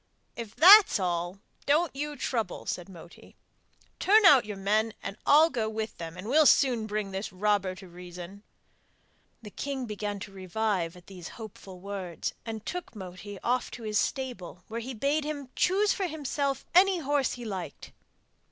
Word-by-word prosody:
'If 225 Hz, -2 st, -7 dB
that 395 Hz, +5 st, +10 dB
is -, -, 0 dB
all, 175 Hz, 0 st, -2 dB, 0.3 s
don't 305 Hz, +2 st, +2 dB
you 295 Hz, +1 st, -4 dB
trouble,' 225 Hz, -9 st, -3 dB
said 180 Hz, +1 st, -4 dB
Moti. 170 Hz, -2 st, -14 dB, 0.6 s
'Turn 420 Hz, +2 st, +5 dB
out 275 Hz, -, +8 dB
your 210 Hz, -2 st, -6 dB
men, 215 Hz, +3 st, 0 dB
and 195 Hz, -, -5 dB
I'll 315 Hz, +3 st, +6 dB
go 225 Hz, -5 st, -1 dB
with 220 Hz, 0 st, -5 dB
them, 165 Hz, +1 st, -7 dB
and 185 Hz, +3 st, -7 dB
we'll 300 Hz, +4 st, +5 dB
soon 245 Hz, -5 st, +3 dB
bring 210 Hz, -2 st, -3 dB
this 195 Hz, +3 st, -4 dB
robber 195 Hz, -1 st, 0 dB
to 190 Hz, 0 st, -12 dB
reason.' 180 Hz, +2 st, -10 dB, 1.0 s
The 210 Hz, -, -9 dB
king 275 Hz, +1 st, -4 dB
began 210 Hz, -2 st, -4 dB
to 195 Hz, -, -7 dB
revive 190 Hz, -2 st, -2 dB
at 175 Hz, -, -16 dB
these 180 Hz, -3 st, -10 dB
hopeful 210 Hz, -4 st, -10 dB
words, 190 Hz, -3 st, -5 dB
and 220 Hz, -1 st, -6 dB
took 355 Hz, -9 st, -6 dB
Moti 195 Hz, +1 st, -8 dB
off 250 Hz, +1 st, 0 dB
to 235 Hz, -, -9 dB
his 215 Hz, -1 st, 0 dB
stable 215 Hz, -10 st, -4 dB
where 230 Hz, +1 st, -4 dB
he 250 Hz, +2 st, -6 dB
bade 285 Hz, +6 st, 0 dB
him 290 Hz, -3 st, -5 dB
choose 400 Hz, +3 st, +2 dB
for 385 Hz, -, -2 dB
himself 285 Hz, -3 st, -2 dB
any 375 Hz, +2 st, +5 dB
horse 285 Hz, -3 st, 0 dB
he 245 Hz, -1 st, -8 dB
liked. 185 Hz, -8 st, -6 dB
220 Hz, 170 wpm, -28 LUFS, 190-280 Hz, 1.0 s, that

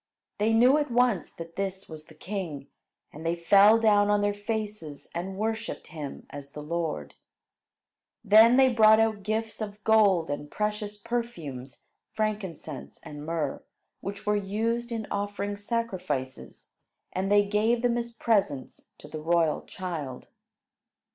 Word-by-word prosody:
They 215 Hz, +2 st, +2 dB
knew 250 Hz, +6 st, +5 dB
at 295 Hz, -, -1 dB
once 240 Hz, -7 st, +2 dB
that 165 Hz, 0 st, -10 dB
this 195 Hz, 0 st, -3 dB
was 155 Hz, -1 st, -10 dB
the 155 Hz, -, -17 dB
king; 165 Hz, -6 st, -5 dB, 0.4 s
and 155 Hz, -, -9 dB
they 165 Hz, +1 st, 0 dB
fell 200 Hz, +5 st, +6 dB
down 205 Hz, -2 st, +4 dB
on 205 Hz, 0 st, +3 dB
their 205 Hz, 0 st, +1 dB
faces 205 Hz, -7 st, -5 dB
and 190 Hz, +3 st, -4 dB
worshipped 220 Hz, +2 st, -3 dB
him 150 Hz, -4 st, -7 dB
as 140 Hz, 0 st, -9 dB
the 150 Hz, -, -7 dB
Lord. 155 Hz, -, -3 dB, 1.1 s
Then 225 Hz, +4 st, +7 dB
they 265 Hz, 0 st, +7 dB
brought 220 Hz, -1 st, +7 dB
out 220 Hz, -2 st, +1 dB
gifts 220 Hz, +2 st, -3 dB
of 210 Hz, 0 st, -6 dB
gold 200 Hz, -8 st, +4 dB
and 145 Hz, 0 st, -4 dB
precious 210 Hz, +1 st, -3 dB
perfumes, 180 Hz, -, -5 dB, 0.3 s
frankincense 195 Hz, -9 st, -4 dB
and 150 Hz, -2 st, -8 dB
myrrh, 155 Hz, -3 st, -2 dB, 0.4 s
which 200 Hz, +2 st, -7 dB
were 210 Hz, 0 st, +2 dB
used 225 Hz, +4 st, -1 dB
in 225 Hz, -2 st, -3 dB
offering 205 Hz, 0 st, -2 dB
sacrifices; 185 Hz, -, -4 dB, 0.4 s
and 190 Hz, +2 st, -1 dB
they 205 Hz, 0 st, +5 dB
gave 220 Hz, +4 st, +1 dB
them 240 Hz, -1 st, +2 dB
as 235 Hz, 0 st, -2 dB
presents 205 Hz, -, -1 dB
to -, -, -13 dB
the 155 Hz, +1 st, -7 dB
royal 165 Hz, -1 st, +2 dB
child. 155 Hz, -9 st, -6 dB
205 Hz, 145 wpm, -27 LUFS, 165-220 Hz, 1.1 s, Then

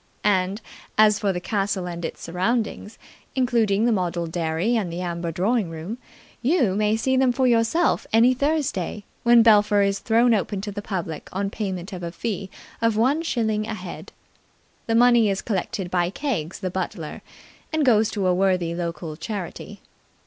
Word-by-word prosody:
And, 195 Hz, 0 st, +1 dB, 0.4 s
as 215 Hz, 0 st, +5 dB
for 200 Hz, -2 st, +1 dB
the 180 Hz, -, -3 dB
castle 195 Hz, -1 st, -1 dB
and 170 Hz, -1 st, -6 dB
its -, -, -5 dB
surroundings, 210 Hz, +4 st, -2 dB, 0.4 s
including 230 Hz, -5 st, +2 dB
the 240 Hz, -, +3 dB
model 175 Hz, -4 st, -1 dB
dairy 165 Hz, +6 st, -1 dB
and 200 Hz, -7 st, -1 dB
the 170 Hz, -, -5 dB
amber 170 Hz, -1 st, -3 dB
drawing 195 Hz, +3 st, 0 dB
room, 165 Hz, +9 st, -6 dB, 0.4 s
you 260 Hz, -, +2 dB
may 210 Hz, +1 st, +2 dB
see 260 Hz, +4 st, +1 dB
them 260 Hz, -1 st, +4 dB
for 260 Hz, +2 st, +1 dB
yourself 240 Hz, +8 st, +2 dB
any 230 Hz, +3 st, +5 dB
Thursday, 260 Hz, -, -1 dB, 0.2 s
when 235 Hz, -1 st, +6 dB
Belpher 210 Hz, -2 st, +5 dB
is 200 Hz, 0 st, 0 dB
thrown 230 Hz, +1 st, +3 dB
open 205 Hz, -1 st, -1 dB
to 205 Hz, +1 st, -5 dB
the 205 Hz, +1 st, -5 dB
public 175 Hz, -7 st, -5 dB
on 195 Hz, +1 st, -2 dB
payment 190 Hz, -3 st, -4 dB
of 180 Hz, -, -6 dB
a 170 Hz, -1 st, -4 dB
fee 195 Hz, 0 st, -4 dB, 0.3 s
of 230 Hz, -2 st, +2 dB
one 265 Hz, +8 st, +2 dB
shilling 220 Hz, -8 st, -1 dB
a 225 Hz, -, -3 dB
head. 180 Hz, -3 st, -8 dB, 0.8 s
The 225 Hz, -, +1 dB
money 240 Hz, -2 st, +5 dB
is 195 Hz, 0 st, -2 dB
collected 190 Hz, -3 st, -3 dB
by 175 Hz, -1 st, +1 dB
Keggs 195 Hz, -, -3 dB
the 185 Hz, -2 st, -2 dB
butler, 175 Hz, -3 st, -4 dB, 0.5 s
and 315 Hz, -2 st, +1 dB
goes 220 Hz, -4 st, +4 dB
to 200 Hz, -3 st, -2 dB
a 180 Hz, -, +3 dB
worthy 180 Hz, -2 st, +1 dB
local 170 Hz, -2 st, -4 dB
charity. 185 Hz, +2 st, -6 dB
205 Hz, 170 wpm, -23 LUFS, 180-230 Hz, 0.8 s, when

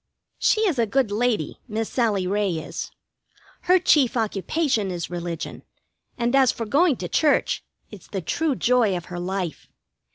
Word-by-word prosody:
She 435 Hz, -, +3 dB
is 360 Hz, -, +1 dB
a 230 Hz, -, +2 dB
good 255 Hz, -1 st, +1 dB
lady, 215 Hz, -6 st, 0 dB
Miss 220 Hz, -1 st, -2 dB
Sallie 215 Hz, -7 st, 0 dB
Ray 200 Hz, 0 st, 0 dB
is. 160 Hz, -, -5 dB, 0.8 s
Her 365 Hz, +1 st, +6 dB
chief 285 Hz, -8 st, +3 dB
occupation 220 Hz, -, 0 dB
is 175 Hz, -1 st, -4 dB
religion, 170 Hz, -2 st, -5 dB, 0.6 s
and 240 Hz, +1 st, +1 dB
as 265 Hz, -2 st, +5 dB
for 230 Hz, -, -5 dB
going 290 Hz, +6 st, +3 dB
to -, -, -5 dB
church, 300 Hz, -2 st, +2 dB, 0.3 s
it's 210 Hz, -4 st, -12 dB
the 195 Hz, -, -4 dB
true 285 Hz, -, -1 dB
joy 235 Hz, -7 st, +2 dB
of 175 Hz, -, -7 dB
her 175 Hz, -, -4 dB
life. 180 Hz, -2 st, -4 dB
225 Hz, 160 wpm, -24 LUFS, 190-270 Hz, 0.8 s, Her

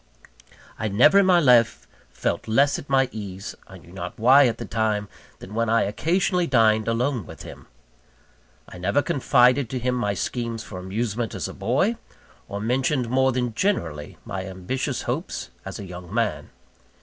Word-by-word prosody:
I 110 Hz, -, -1 dB
never 125 Hz, -, +5 dB
in 195 Hz, -, +4 dB
my 180 Hz, -2 st, +6 dB
life 120 Hz, -, +4 dB, 0.2 s
felt -, -, -3 dB
less 140 Hz, +6 st, +3 dB
at 140 Hz, -, -12 dB
my 135 Hz, -1 st, +3 dB
ease 100 Hz, -2 st, -7 dB
I -, -, -12 dB
knew 85 Hz, -, -17 dB
not 90 Hz, -1 st, -7 dB
why 130 Hz, +4 st, +6 dB
at 115 Hz, -, -2 dB
the -, -, -6 dB
time 110 Hz, -2 st, -1 dB, 0.3 s
than 100 Hz, -, -11 dB
when 115 Hz, 0 st, 0 dB
I 115 Hz, 0 st, +3 dB
occasionally 175 Hz, -, 0 dB
dined 110 Hz, -4 st, +3 dB
alone 115 Hz, -, -1 dB
with -, -, -10 dB
him. -, -, -11 dB, 1.0 s
I 90 Hz, -, -11 dB
never 100 Hz, +11 st, +1 dB
confided 125 Hz, -5 st, +3 dB
to 130 Hz, -, -3 dB
him 125 Hz, +1 st, -1 dB
my 105 Hz, -5 st, -1 dB
schemes 115 Hz, +2 st, -3 dB
for 90 Hz, -, -8 dB
amusement 110 Hz, +4 st, -3 dB
as -, -, -3 dB
a -, -, -8 dB
boy, 135 Hz, -, 0 dB, 0.5 s
or 100 Hz, -, -4 dB
mentioned 125 Hz, +3 st, 0 dB
more 130 Hz, 0 st, +3 dB
than 125 Hz, -2 st, -2 dB
generally 80 Hz, -, -2 dB
my 95 Hz, -1 st, -4 dB
ambitious 95 Hz, +7 st, -3 dB
hopes, 65 Hz, -, -4 dB
as -, -, -6 dB
a 100 Hz, -, -7 dB
young 90 Hz, -1 st, -10 dB
man. -, -, -1 dB
115 Hz, 175 wpm, -24 LUFS, 100-130 Hz, 1.0 s, my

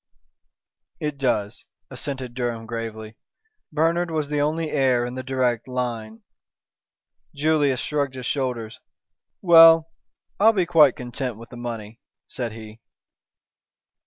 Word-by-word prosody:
"It 150 Hz, -2 st, -4 dB
does," 110 Hz, -6 st, -1 dB, 0.3 s
assented 130 Hz, -3 st, -5 dB
Durham 120 Hz, -2 st, -3 dB
gravely. 110 Hz, -1 st, -6 dB, 0.5 s
"Bernard 165 Hz, +3 st, +1 dB
was 155 Hz, -3 st, -2 dB
the 150 Hz, -1 st, 0 dB
only 155 Hz, +2 st, -1 dB
heir 130 Hz, -4 st, +2 dB
in 125 Hz, -, -5 dB
the 130 Hz, -, -5 dB
direct 130 Hz, -3 st, -1 dB
line." 115 Hz, -3 st, -4 dB, 1.1 s
Julius 145 Hz, -3 st, +2 dB
shrugged 140 Hz, -3 st, -2 dB
his 130 Hz, -1 st, -7 dB
shoulders. 120 Hz, -5 st, -3 dB, 0.6 s
"Well, 165 Hz, -2 st, +7 dB, 0.5 s
I'll 220 Hz, +3 st, +6 dB
be 185 Hz, -4 st, +1 dB
quite 155 Hz, -6 st, +5 dB
content 125 Hz, -1 st, -5 dB
with 115 Hz, +1 st, -12 dB
the 120 Hz, -, -11 dB
money," 115 Hz, -2 st, -7 dB, 0.3 s
said 120 Hz, -3 st, -5 dB
he. 110 Hz, 0 st, -11 dB
130 Hz, 120 wpm, -23 LUFS, 115-150 Hz, 1.1 s, Well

